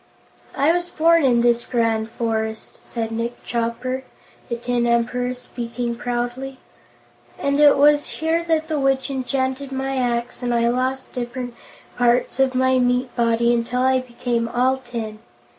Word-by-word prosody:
"I 285 +4 +3
was 350 0 -1
born 330 0 +4
in 245 -3 +4
this 240 0 +3
grand 225 -2 0
forest," 220 -1 -3
said 225 -2 -4
Nick 235 +2 -4
Chopper, 235 +2 -2 0.5
the 235 - -1
tin 240 0 0
Emperor, 245 +1 +1
speaking 240 -1 -4
proudly, 245 +3 -3 0.8
"and 280 +1 0
it 295 -1 +7
was 290 +1 +4
here 325 +1 0
that 320 -1 +1
the 310 -2 -1
Witch 270 0 +1
enchanted 265 +1 -2
my 270 0 -2
axe 240 -1 -1
and 245 -1 0
I 235 0 +3
lost 255 +2 -1
different 245 0 -4 0.5
parts 245 +1 +2
of 265 -1 +3
my 260 0 +3
meat 250 0 +1
body 235 0 +2
until 240 +2 0
I 260 0 +4
became 240 -2 -2
all 250 +3 +2
tin. 230 -4 -6
245 Hz, 150 wpm, -22 LUFS, 235-265 Hz, 0.8 s, it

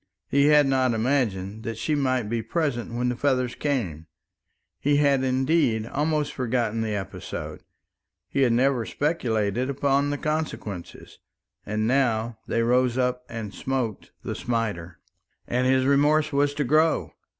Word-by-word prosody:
He 140 +1 +3
had 150 -1 +6
not 130 -3 +2
imagined 110 -5 -1
that 115 0 -5
she 150 +7 -1
might 130 -4 +1
be 115 +2 -2
present 120 -1 -2
when 125 +1 -1
the 125 - -1
feathers 130 -2 0
came. 95 - -2 0.7
He 145 +1 +2
had 140 -2 +3
indeed 130 -3 +1
almost 150 +3 -1
forgotten 120 -3 -1
the 110 -2 -1
episode, 95 -3 -6 0.7
he 140 - -1
had 125 -3 +4
never 125 +1 +2
speculated 120 - -1
upon 140 +1 +1
the 145 - -1
consequences, 150 - -4 0.5
and 110 +1 -1
now 120 -3 +1
they 115 - +1
rose 125 +1 +2
up 125 -1 0
and 110 -3 -6
smote 130 -6 -3
the - - -3
smiter. 105 -8 -3 0.5
And 125 +1 0
his 130 0 +3
remorse 145 +2 +3
was 145 0 +2
to 145 - 0
grow. 155 +4 +2
125 Hz, 145 wpm, -25 LUFS, 115-140 Hz, 0.7 s, had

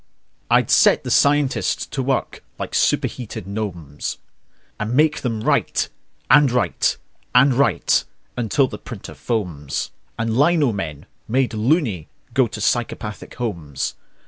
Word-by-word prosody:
I'd - - +3
set - - +5
the - - -4
scientists 145 -1 +2
to 135 - -4
work 130 -1 -2
like - - -5
superheated 115 -7 0
gnomes, 95 -8 -4 0.6
And 110 +3 -2
make 150 +2 +3
them 115 -4 -2
write - - +1 0.4
and 145 -4 +6
write 125 0 +1 0.4
and 135 +2 +6
write 140 +3 +2 0.3
until 125 +3 +2
the - - -8
printer 115 -6 -9
foams 90 - -3 0.3
And 115 0 -1
lino 145 -1 +4
men, 80 -7 -5 0.2
made 125 +1 +1
"loony", 110 - +1 0.3
go 130 -2 +3
to 110 - -7
psychopathic 110 0 -2
homes. 85 - -3
115 Hz, 125 wpm, -21 LUFS, 100-135 Hz, 0.6 s, and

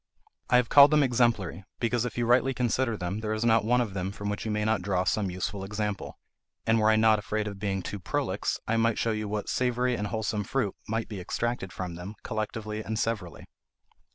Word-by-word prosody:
I - - +4
have 125 -2 +2
called 140 0 +9
them 150 -1 +4
exemplary, 115 -8 +1 0.2
because 120 0 +1
if 125 - -5
you 120 - +1
rightly 125 +2 +3
consider 125 -1 0
them, 90 +3 -3
there 110 -1 -2
is 110 +2 -1
not 115 -2 +4
one 125 +3 +3
of 110 -5 -3
them 95 0 -2
from 100 0 -5
which 105 - -4
you - - -2
may 105 0 0
not 110 -2 +1
draw 90 -1 0
some 100 +1 0
useful 95 +2 -3
example; 105 0 -4 0.5
and 115 0 +3
were 110 0 +4
I 110 - +5
not 110 -1 +4
afraid 105 +1 -2
of 100 -1 -6
being 95 -2 -2
too 105 - -5
prolix, - - -2
I 115 - +1
might 115 0 +2
show 115 - +1
you 110 -1 -2
what 105 0 -3
savoury 125 0 +1
and 105 -3 -2
wholesome 110 -1 -2
fruit 105 -1 -1
might 110 +1 -2
be 105 -3 -6
extracted 120 0 -2
from 90 -2 -5
them, 90 +5 -7
collectively 110 -1 -3
and 110 +1 -3
severally. 105 -7 -3
110 Hz, 220 wpm, -28 LUFS, 100-115 Hz, 0.5 s, called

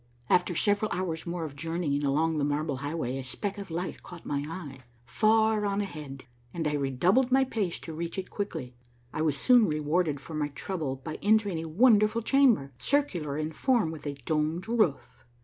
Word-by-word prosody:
After 180 0 +3
several 205 +3 +2
hours 175 -3 -3
more 170 0 -3
of 150 -3 -6
journeying 160 -2 -2
along 155 +3 +1
the - - 0
Marble 145 0 -1
Highway 140 -2 -3
a - - -5
speck 200 +10 -4
of 200 - -7
light 175 +3 -4
caught 175 -2 -12
my 140 -1 -1
eye, 155 -6 -7 0.3
far 220 - +3
on 200 0 0
ahead, 150 -9 -6 0.3
and 165 -2 -1
I 150 - -1
redoubled 160 - +2
my 265 +1 +5
pace 215 -9 -2
to 165 - -7
reach 170 +3 -4
it 190 - -5
quickly. 165 -11 -4 0.4
I 155 - -2
was 155 -3 +1
soon 245 - +5
rewarded 150 0 0
for 160 - -10
my 150 -1 0
trouble 150 -1 -4
by 145 +4 -7
entering 205 -4 +2
a 160 0 -5
wonderful 215 +3 +4
chamber, 240 - +3
circular 175 - 0
in 155 +1 -2
form, 235 - +1
with 155 -2 -8
a 140 - -3
domed 155 - -1
roof. 215 - 0
165 Hz, 185 wpm, -28 LUFS, 145-205 Hz, 0.4 s, my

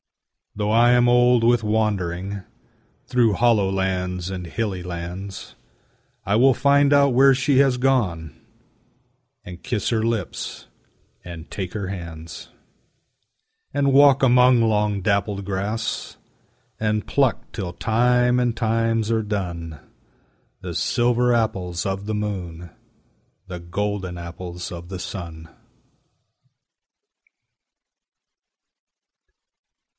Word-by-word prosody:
Though 105 0 -1
I 120 +2 +5
am 120 0 +4
old 120 -1 +4
with 120 0 +3
wandering 100 -3 -1 0.6
Through 120 -4 +2
hollow 110 -3 +3
lands 90 -2 -2
and 90 -2 -6
hilly 95 -2 -3
lands, 90 +3 -7 0.7
I 100 - +1
will 130 +3 +5
find 140 +2 +3
out 140 -2 +4
where 135 +2 +6
she 135 +1 +2
has 135 -3 +3
gone, 100 - 0 1.1
And 90 -3 -10
kiss 120 -6 -2
her 110 -2 0
lips 115 -5 -4 0.6
and 85 -2 -10
take 95 -3 -5
her 100 -3 -4
hands; 85 -4 -8 1.2
And 140 -1 +1
walk 140 -1 +6
among 125 -1 +5
long 105 -2 +1
dappled 100 0 -1
grass, 100 +4 -3 0.6
And 105 -1 -1
pluck 135 -4 0
till 95 -6 -4
time 125 +5 +2
and 120 -2 0
times 115 0 0
are 110 -1 +1
done 85 -7 -4 0.8
The - - -6
silver 120 +1 +1
apples 95 -7 -1
of 95 +1 -3
the 110 - -2
moon, 90 -5 -5 0.8
The 90 -2 -7
golden 95 +1 -4
apples 85 +1 -7
of 85 0 -8
the 95 -2 -6
sun. 85 -4 -7
105 Hz, 110 wpm, -22 LUFS, 90-120 Hz, 1.2 s, where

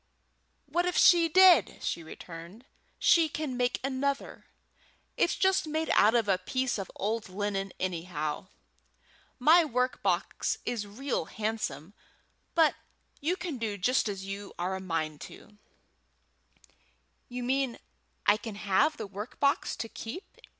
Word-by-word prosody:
"What 350 +3 0
if 360 - -1
she 340 -2 +6
did?" 370 +1 +6
she 170 - -2
returned. 170 +7 -10 0.3
"She 330 -2 +4
can 295 -3 -4
make 245 0 0
another. 275 +1 -2 0.7
It's - - +2
just 380 -4 +2
made 315 +1 -1
out 215 +3 +5
of 230 -3 +2
a 190 -2 +2
piece 255 +4 -1
of 195 - -5
old 215 +1 -2
linen, 195 0 -2
anyhow. 165 -4 -3 0.9
My 325 +7 +6
work 250 -3 -1
box - - 0
is 230 -4 -2
real 250 - -3
handsome; 205 -6 -4 0.6
but 320 -2 +5 0.5
you 340 +6 0
can 325 -10 -5
do 215 -3 -2
just 230 +4 +2
as 195 -1 -5
you 195 +1 -7
are 180 +2 -2
a - - -4
mind 160 -4 -3
to." - - -14 1.1
"Do - - -26 0.6
you 245 0 -5
mean 265 0 0 0.5
I 205 - +5
can 220 -1 -7
have 210 +10 +2
the 220 - -4
work 205 +4 -8
box 280 0 +1
to 225 - -4
keep?" 230 - -7
225 Hz, 145 wpm, -29 LUFS, 195-280 Hz, 1.1 s, she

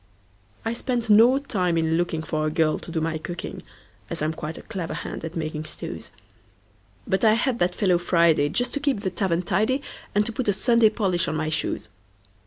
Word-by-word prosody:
I 225 - 0
spent 240 -2 -1
no 235 +5 +7
time 185 -11 0
in 160 -1 +1
lookingFor 160 -2 -1
a - - +1
girl 155 0 +1
to - - -7
do 160 - -1
my 160 0 -1
cooking, 175 +3 -6 0.5
As 165 -2 -2
I'm 155 +1 0
quite 155 0 -6
a - - -10
clever 180 -5 -5
hand - - -6
at 160 +1 -6
making 155 -1 -3
stews; - - -6 1.0
But 190 - 0
I 215 -1 +6
had 240 +2 0
that 175 0 +1
fellow 185 -4 +2
Friday, 170 -4 +3
Just 245 +9 0
to 285 - 0
keep 280 -7 0
the 190 -3 -2
tavern 180 -1 0
tidy, 220 +10 +1 0.3
And 205 0 +3
to 230 - -1
put 240 +1 -3
a 205 - +4
Sunday 230 +2 +4
polish 185 -5 0
on 155 - -1
my 155 0 -1
shoes. 110 -8 -2
180 Hz, 200 wpm, -24 LUFS, 160-225 Hz, 1.0 s, no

